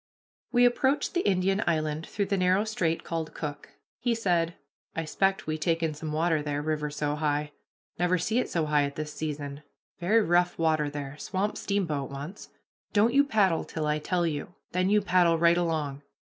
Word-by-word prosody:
We 245 -1 +5
approached 265 +4 +2
the 355 - +1
Indian 195 +2 +2
Island 155 -1 0
through 200 - -1
the 200 +1 0
narrow 185 +2 +3
strait 170 -7 -1
called 165 -1 -4
"Cook." 145 -2 -5 0.3
He 240 -1 +1
said: 175 -6 +1 0.4
"I 165 - -1
'xpect 195 +5 0
we 155 0 -2
take 165 +1 0
in 160 -1 0
some 150 +1 -5
water 160 0 +1
there, 145 -1 -2
river 150 -1 -1
so 145 0 -2
high 150 -1 -1 0.5
never 180 +1 +3
see 205 +8 0
it - - -1
so 165 -2 0
high 150 -1 +3
at 140 0 -5
this 155 -1 -5
season. 145 -2 -5 0.4
Very 210 +6 +3
rough 175 -1 +2
water 155 -2 +2
there; 145 -1 -6
swamp 200 +2 -2
steamboat 165 -9 -1
once. 145 +8 -8 0.4
Don't 220 +3 +4
you 280 +1 +6
paddle 205 - +2
till 155 -2 -4
I 150 0 +1
tell 175 +3 0
you. 160 +2 -3 0.2
Then 185 +1 +1
you 210 +1 +4
paddle 175 -3 +4
right 170 +1 +5
along." 155 -5 -1
165 Hz, 185 wpm, -28 LUFS, 150-190 Hz, 0.5 s, you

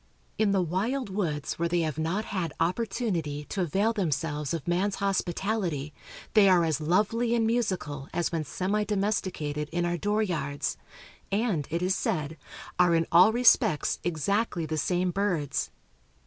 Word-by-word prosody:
In 215 -2 +3
the 195 -2 +2
wild 205 - -1
woods 160 -9 -2
where 170 0 +1
they 175 0 +1
have 155 -1 -2
not 175 +7 -1
had 180 -7 -3
opportunity 180 - -1
to 195 - -2
avail 195 +7 +1
themselves 150 -6 -1
of 165 -2 -4
man's 185 +3 +1
hospitality 185 -5 -1 0.4
they 205 -3 +6
are 175 -2 +5
as 160 -1 0
lovely 215 +8 +1
and 230 -1 +2
musical 185 - -1
as 175 - -1
when 165 -2 -1
semi 195 +8 -1
domesticated 185 -8 -2
in 175 +1 0
our 175 0 0
door 210 +4 +1
yards, 145 -7 -2 0.6
and, 200 - 0
it 170 +2 -1
is 185 +1 +2
said, 155 -2 -2 0.4
are 175 -1 +5
in 165 0 +2
all 180 +5 +7
respects 230 -10 +3
exactly 175 +2 0
the 155 0 -3
same 180 +3 0
birds. 175 -8 -1
180 Hz, 155 wpm, -28 LUFS, 160-205 Hz, 0.6 s, all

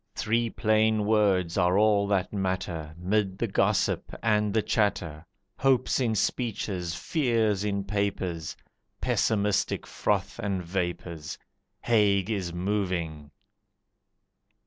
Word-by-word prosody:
Three 115 +2 0
plain 110 -1 +2
words 100 -5 +2
are 90 +1 +3
all 105 -1 +3
that 100 -1 0
matter, 95 -5 -3
Mid 95 +1 0
the - - 0
gossip - - 0
and 105 -2 +2
the 110 0 +1
chatter, 90 -7 -1 0.3
Hopes 130 -1 +2
in 115 -4 +1
speeches, 100 -6 -2
fears 115 - +1
in 100 -1 -1
papers, 95 -5 -2 0.4
Pessimistic 105 -2 +1
froth - - -1
and 95 -3 -2
vapours 85 -3 -4 0.4
Haig 105 -3 +2
is 95 -5 -2
moving! 90 -5 -2
100 Hz, 105 wpm, -27 LUFS, 90-110 Hz, 0.4 s, are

